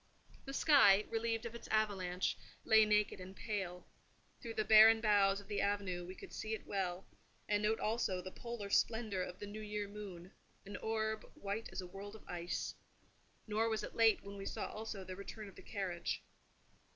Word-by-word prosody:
The 275 - -6
sky, 215 -11 +6
relieved 225 0 -1
of 235 - -5
its 235 - -9
avalanche, 190 -4 0 0.3
lay 220 0 +7
naked 210 -2 +2
and 185 +1 -9
pale: 190 -4 -4 0.6
through 230 -1 -6
the 215 - 0
barren 220 +1 +9
boughs 205 -2 +4
of 200 - -13
the 205 -1 -1
avenue 195 -3 -1
we 185 - -7
could - - -11
see 220 0 -2
it - - -10
well, 190 -2 -2 0.4
and 205 0 +2
note 215 +1 +2
also 215 -4 0
the 185 +1 -7
polar 235 -3 -6
splendour 220 -5 +2
of 180 0 -5
the - - -6
new 210 +1 -7
year 210 -1 -3
moon—an 200 0 -10
orb 220 -1 -1
white 205 +3 -4
as - - -4
a - - -7
world 200 +3 -8
of 220 - -14
ice. 175 0 -3 0.7
Nor 220 +1 +1
was 220 -1 -1
it - - -6
late 225 -2 +4
when 200 0 -8
we 195 - -6
saw - - -3
also 215 -2 -5
the 185 0 -7
return 205 +2 -8
of 195 - -13
the - - -11
carriage. 185 -4 -3
205 Hz, 190 wpm, -36 LUFS, 195-220 Hz, 0.7 s, barren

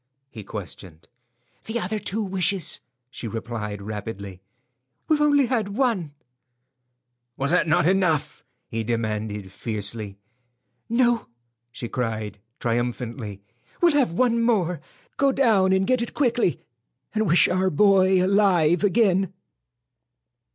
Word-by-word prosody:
he 110 -4 -9
questioned. 90 -5 -8 0.6
"The 230 +2 -2
other 210 +2 -2
two 210 +2 -1
wishes," 190 -2 0 0.3
she 120 - -6
replied, 110 -2 -5
rapidly. 100 -3 -6 0.7
"We've 305 -1 +2
only 290 -2 +4
had 220 -5 -1
one." 200 - 0 1.2
"Was 140 +3 -1
not 180 -1 +3
that 155 -1 +3
enough?" 165 -6 +1 0.2
he 115 -1 -3
demanded, 110 -3 -3
fiercely. 105 -1 -3 0.7
"No," 240 0 +2 0.4
she 120 - -5
cried, 110 -4 -3 0.2
triumphantly; 115 -3 -3 0.4
"we'll 345 -2 +4
have 280 - +2
one 235 +3 +2
more. 180 -9 +1 0.4
Go 275 0 +3
down 220 -9 +3
and 190 0 +3
get 255 +3 +2
it 235 - -5
quickly, 240 - +1 0.5
and 220 -1 +1
wish 170 +1 +5
our 185 +1 +1
boy 190 +1 +4
alive 185 -4 +3
again." 195 -3 +3
175 Hz, 115 wpm, -24 LUFS, -, 1.2 s, wish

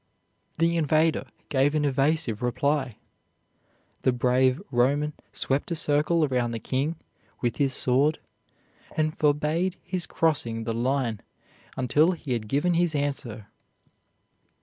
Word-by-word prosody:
The 165 +1 +2
invader 155 +1 +2 0.2
gave 140 +2 +2
an 150 -1 +1
evasive 140 -4 +1
reply. 130 0 0 1.0
The 130 - +3
brave 125 +2 +2
Roman 140 +5 +2 0.2
swept 135 +5 -1
a 170 - -1
circle 155 +2 +2
around 125 -4 0
the 115 - -3
king 140 +8 -1 0.5
with 120 -2 -1
his 140 -2 +2
sword, 140 +5 +2 0.8
and 155 0 +1
forbade 155 +5 +1
his 180 -3 -3
crossing 120 -8 0
the 115 0 -2
line 120 -2 -1 0.6
until 145 +7 +3
he 150 -6 -4
had 110 -3 -3
given 145 +9 +1
his 170 -2 +1
answer. 135 -7 -3
140 Hz, 125 wpm, -26 LUFS, 125-155 Hz, 1.0 s, The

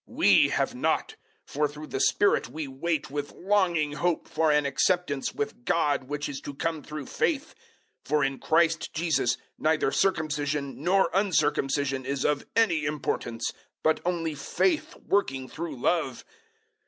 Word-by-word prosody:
005:005 - - -13
*We* - - +6
have - - 0
not, - - 0 0.3
for 150 +1 0
through 150 +1 -9
the 135 - -4
Spirit 205 +8 +3
we 155 -2 -5
wait 150 +2 -2
with 145 0 -4
longing 175 -6 +1
hope 170 +2 -1
for 160 0 +2
an 150 -1 +3
acceptance 145 0 +1
with 140 -3 -4
God 145 -2 +1
which 145 +2 -3
is 140 -2 -6
to 145 - -7
come 160 +1 -2
through 150 -1 -7
faith. 300 - -1 0.5
005:006 - - -19
For 150 -1 +2
in 135 -1 -1
Christ 160 -1 +2
Jesus 160 -7 +1 0.2
neither 155 -3 +2
circumcision 150 -6 0
nor 190 +3 +3
uncircumcision 140 -8 +1
is 140 -1 -1
of 145 -1 0
any 190 -9 +3
importance; 140 -5 -2 0.3
but 160 0 +3
only 170 -3 -1
faith 310 - 0
working 135 -10 +1
through 160 0 -5
love. 150 -2 0
150 Hz, 155 wpm, -27 LUFS, 140-170 Hz, 0.5 s, We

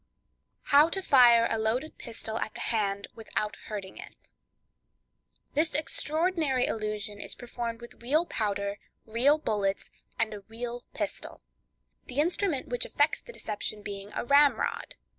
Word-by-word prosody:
How 290 +3 +6
to 385 +3 -1
Fire 240 -6 +7
a 225 - -1
Loaded 235 +8 -1
Pistol 225 -2 -4
at 220 - -4
the - - -6
Hand, 200 -4 0
Without 215 -1 -3
Hurting 200 -3 -6
It.—This 310 +2 -7
extraordinary 310 -2 +1
illusion 210 -1 -2
is - - -2
performed 235 -1 -5
with 235 - -12
real 300 +8 +2
powder, 200 -5 -2 0.3
real 250 +7 +3
bullets, 205 -9 -1 0.3
and 220 -1 +1
a 205 - -7
real 235 +3 -6
pistol; - - -5 0.6
the 255 +2 -3
instrument 340 -2 +1
which 245 0 0
effects 290 +2 +1
the 480 - -11
deception 210 - -4
being 200 0 -6
a - - -2
ramrod. 285 - +3
235 Hz, 135 wpm, -29 LUFS, 215-290 Hz, 0.6 s, Fire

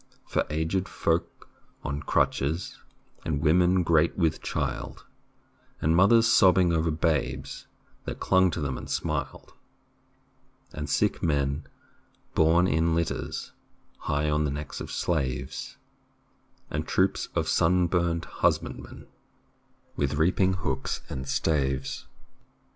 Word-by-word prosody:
For - - -1
aged 80 +5 -1
folk 85 0 -1 0.4
on 70 +1 -3
crutches, 75 +4 0 0.4
And 75 -3 -1
women 90 +4 +3
great 80 -1 +2
with 80 -4 +1
child, - - -4 0.7
And 80 +2 +2
mothers 115 +6 +6
sobbing 95 -5 +5
over 80 0 +1
babes 70 -4 -1 0.4
That - - -5
clung 95 0 +4
to 80 - -4
them 65 -3 -2
and - - -9
smiled, - - -3 1.2
And 75 -1 -5
sick - - +1
men 70 -2 0 0.7
borne 80 +3 +4
in 80 -1 +2
litters 85 -1 -3 0.5
High 75 +1 -1
on 75 0 +1
the 75 - 0
necks 70 +1 -5
of - - -6
slaves, 70 -5 -2 0.9
And - - -3
troops - - +1
of - - 0
sun 90 +2 +3
burned 85 -1 0
husbandmen - - -2 0.9
With 70 0 0
reaping 90 +4 +2
hooks 70 -8 -3
and 65 0 -5
staves. 70 -3 -1
80 Hz, 115 wpm, -27 LUFS, 70-85 Hz, 1.2 s, mothers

